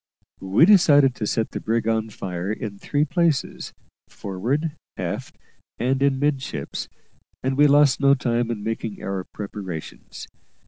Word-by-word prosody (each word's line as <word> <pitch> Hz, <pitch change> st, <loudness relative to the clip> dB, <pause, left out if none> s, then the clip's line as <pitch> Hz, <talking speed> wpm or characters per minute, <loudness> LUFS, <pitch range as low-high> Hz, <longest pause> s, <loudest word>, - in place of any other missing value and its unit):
We 95 Hz, +11 st, +4 dB
decided 150 Hz, -9 st, +6 dB
to 110 Hz, -3 st, -4 dB
set 110 Hz, +1 st, -1 dB
the -, -, -4 dB
brig 115 Hz, 0 st, -1 dB
on 110 Hz, -1 st, 0 dB
fire 95 Hz, -2 st, -4 dB
in 105 Hz, -2 st, -5 dB
three 145 Hz, +6 st, 0 dB
places 165 Hz, -3 st, 0 dB, 0.4 s
forward, 125 Hz, -, -2 dB, 0.3 s
aft, -, -, -5 dB, 0.4 s
and 130 Hz, +2 st, 0 dB
in 140 Hz, -1 st, +3 dB
midships 140 Hz, -1 st, -2 dB, 0.5 s
and 130 Hz, +1 st, 0 dB
we 145 Hz, +2 st, +6 dB
lost 145 Hz, -1 st, +5 dB
no 140 Hz, 0 st, +5 dB
time 120 Hz, -2 st, -1 dB
in 110 Hz, -3 st, -4 dB
making 110 Hz, -1 st, -4 dB
our 95 Hz, -1 st, -3 dB
preparations. 100 Hz, -6 st, -8 dB
120 Hz, 140 wpm, -23 LUFS, 105-145 Hz, 0.5 s, decided